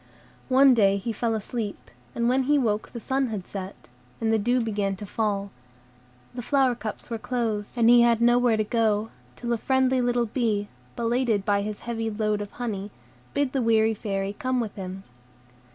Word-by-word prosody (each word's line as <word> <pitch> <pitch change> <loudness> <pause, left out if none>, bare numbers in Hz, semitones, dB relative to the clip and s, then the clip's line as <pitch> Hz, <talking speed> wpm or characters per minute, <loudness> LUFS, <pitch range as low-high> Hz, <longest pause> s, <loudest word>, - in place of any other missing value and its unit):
One 265 +1 +6
day 200 -4 +4
he 225 +4 -3
fell 225 +1 -1
asleep, 215 0 -5 0.2
and 235 0 +1
when 260 +1 +2
he 295 - +5
woke 220 -5 0
the 235 - -6
sun 265 +3 0
had 210 -5 -5
set, 195 -1 -8 0.3
and 225 -1 +1
the 220 - +3
dew 245 +4 +2
began 205 -4 -1
to 205 - -8
fall; 200 -1 -2 0.8
the 245 - -5
flower 265 0 +2
cups 230 0 -7
were 230 - -2
closed, 220 -4 -2
and 235 -2 +3
he 240 0 +7
had 235 -1 +4
nowhere 240 -1 +4
to 215 - +2
go, 220 -1 0 0.2
till 240 0 -2
a - - +1
friendly 260 +2 +2
little 245 -1 +1
bee, 215 -3 -1 0.3
belated 230 -3 0
by 200 -1 +2
his 210 0 -5
heavy 225 -1 -3
load 215 -1 -1
of 205 - -7
honey, 210 -5 -4 0.5
bid 285 -2 +1
the 270 - +1
weary 225 -1 +3
Fairy 195 -2 -3
come 255 +4 -1
with 220 -4 -3
him. 190 0 -7
225 Hz, 185 wpm, -25 LUFS, 205-245 Hz, 0.8 s, he